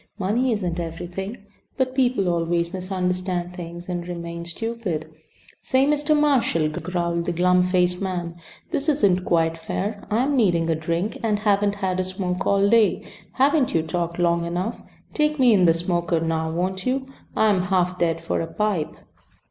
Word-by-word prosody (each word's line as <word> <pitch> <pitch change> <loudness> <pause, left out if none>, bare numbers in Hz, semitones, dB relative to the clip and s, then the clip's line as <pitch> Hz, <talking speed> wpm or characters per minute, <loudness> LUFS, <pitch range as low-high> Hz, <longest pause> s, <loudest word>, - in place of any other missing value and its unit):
Money 225 +6 +1
isn't 180 -6 -1
everything. 175 +5 -6 0.3
But 255 -1 0
people 250 -7 +2
always 170 0 0
misunderstand 180 -1 -2
things 175 -1 -8
and 175 -1 -4
remain 170 -1 -6
stupid 180 -4 -3 0.3
" - - -27
"Say, 260 +1 +2
Mr. 295 +1 +2
Marshal," 255 - +2
growled 170 +1 -2
the 175 - 0
glum 180 +1 +3
faced 180 0 +1
man. 175 -3 -3 0.4
"This 285 +3 0
isn't 200 -11 +3
quite 165 -1 +1
fair. 200 +5 -3
I'm 255 +7 +1
needing 170 -9 +2
a - - +2
drink, 170 +6 -2
and 215 -2 +1
haven't 205 -1 +2
had 190 -2 -1
a - - +2
smoke 185 0 -3
all 200 0 +3
day. 225 0 +3 0.3
Haven't 275 - +2
you 160 - +2
talked 170 +1 -2
long 170 -1 +2
enough? 180 +6 -3 0.3
Take 300 0 +1
me 250 -4 +5
in 185 -3 +4
the 165 - +6
smoker 170 -1 0
now, 160 0 -1
won't 185 +3 -2
you? 260 +1 -1 0.3
I'm 210 -4 +3
half 180 0 0
dead 165 -1 +1
for 165 - -2
a 165 - -3
pipe." 195 -3 -1
180 Hz, 165 wpm, -23 LUFS, 170-210 Hz, 0.4 s, the